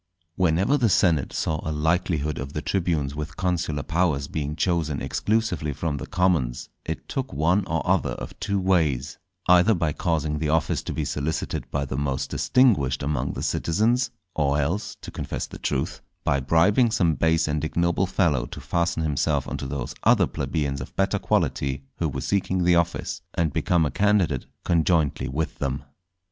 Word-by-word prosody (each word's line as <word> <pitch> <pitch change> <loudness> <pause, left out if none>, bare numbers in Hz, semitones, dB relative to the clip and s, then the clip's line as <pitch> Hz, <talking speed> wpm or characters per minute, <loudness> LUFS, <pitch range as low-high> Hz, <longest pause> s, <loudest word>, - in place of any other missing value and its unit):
_ - - -42
Whenever 95 - +2
the 120 -3 +3
senate 85 -7 +3
saw 80 -1 -1
a - - -3
likelihood 80 -1 0
of 70 +3 -6
the 75 - -2
tribunes 80 -7 0
with 75 +1 -6
consular 90 -5 -1
powers 80 -5 0
being 75 0 -3
chosen 80 -3 0
exclusively 105 -9 0
from 75 +1 -2
the - - -6
commons, 90 -10 0
it 80 - -5
took 130 -1 -3
one 90 +6 +2
or 80 -4 -1
other - - +2
of - - -7
two 100 -2 0
ways,—either 90 - +2
by 85 -4 0
causing 75 -3 -1
the 75 -1 -1
office 80 0 +1
to - - -5
be 80 - -2
solicited 70 +3 -3
by 70 -1 -1
the 65 0 -3
most 70 -2 -2
distinguished 85 - +3
among 75 +1 -1
the - - -5
citizens; 115 +8 +1 0.2
or 75 -2 +1
else, 85 +9 -2
to - - -8
confess - - -4
the - - -10
truth, - - -2 0.2
by 70 - +2
bribing 85 - +4
some 90 -8 +2
base 80 +1 +2
and 75 0 -1
ignoble 85 +3 +1
fellow 80 -9 +1
to - - -8
fasten 85 -1 0
himself 75 -4 0
on - - -3
to 70 - -4
those 70 +1 -4
other - - +5
plebeians 70 -3 -2
of - - -9
better 95 0 +1
quality 70 0 0
who - - 0
were - - -4
seeking 95 -2 0
the 90 0 +4
office, 85 0 0
and 80 -4 +1
become 85 -3 +2
a 75 - -1
candidate 100 -10 +2 0.2
conjointly 80 -3 +2
with 75 +4 -3
them. 70 0 -2
80 Hz, 175 wpm, -25 LUFS, 70-90 Hz, 0.2 s, other